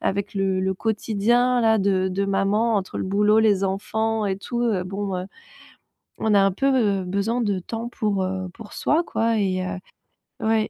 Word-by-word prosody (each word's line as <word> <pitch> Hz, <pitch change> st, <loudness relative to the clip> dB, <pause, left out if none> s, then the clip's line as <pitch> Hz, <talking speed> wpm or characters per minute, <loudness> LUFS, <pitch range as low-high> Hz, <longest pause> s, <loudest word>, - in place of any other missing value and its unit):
avec 200 Hz, +1 st, -2 dB
le 190 Hz, -1 st, 0 dB
le 190 Hz, 0 st, 0 dB
quotidien 230 Hz, +4 st, +1 dB
là 220 Hz, -1 st, +3 dB
de 190 Hz, -1 st, +1 dB
de 195 Hz, +2 st, -1 dB
maman 200 Hz, +4 st, +1 dB
entre 190 Hz, -2 st, -3 dB
le -, -, -2 dB
boulot, 210 Hz, +3 st, +3 dB
les 205 Hz, -3 st, +3 dB
enfants 220 Hz, +3 st, -1 dB
et 190 Hz, -1 st, -1 dB
tout, 240 Hz, +4 st, -4 dB
heu, 205 Hz, -6 st, 0 dB
bon, 195 Hz, 0 st, -3 dB
heu, 180 Hz, -, -4 dB, 0.9 s
on 220 Hz, -1 st, +1 dB
a 200 Hz, -, +6 dB
un 195 Hz, -, +3 dB
peu 215 Hz, -4 st, +1 dB
besoin 200 Hz, +6 st, -1 dB
de 200 Hz, -4 st, 0 dB
temps 225 Hz, +5 st, -5 dB
pour, 210 Hz, -5 st, -1 dB
heu, 185 Hz, 0 st, -3 dB
pour 225 Hz, -3 st, -12 dB
soi 320 Hz, +4 st, +1 dB
quoi 225 Hz, -7 st, 0 dB
et 185 Hz, -2 st, 0 dB
heu, 185 Hz, +1 st, -4 dB, 0.6 s
oui. 220 Hz, -1 st, +1 dB
200 Hz, 185 wpm, -23 LUFS, 190-225 Hz, 0.9 s, a